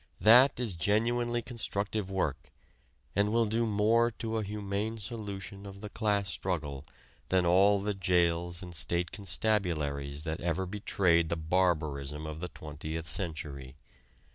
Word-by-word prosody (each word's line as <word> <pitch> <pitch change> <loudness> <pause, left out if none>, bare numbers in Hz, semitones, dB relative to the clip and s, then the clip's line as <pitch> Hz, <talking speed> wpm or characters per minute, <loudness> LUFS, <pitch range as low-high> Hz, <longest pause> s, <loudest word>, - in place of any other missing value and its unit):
That 125 +6 +7
is 120 -6 -1
genuinely 120 +7 +1
constructive 105 -4 -2
work, 95 -1 -2 0.6
and 100 +1 +2
will 115 0 +3
do 115 +2 0
more 110 +3 +3
to 115 -1 -4
a - - -2
humane 105 +2 -3
solution 100 -2 -6
of 100 0 -10
the 105 -1 -7
class 105 -3 0
struggle 80 -5 -3 0.4
than 90 -1 +3
all 100 +4 +5
the 105 +1 -1
jails 85 -2 +1
and 90 -1 -8
state 85 +1 -1
constabularies 80 -8 -1
that 80 -1 -3
ever 85 +2 0
betrayed 90 -4 +2
the 85 - 0
barbarism 80 -4 0
of 80 0 -6
the 90 +1 -4
Twentieth 80 +2 -6
Century. 75 -8 -3
95 Hz, 140 wpm, -30 LUFS, 80-105 Hz, 0.6 s, That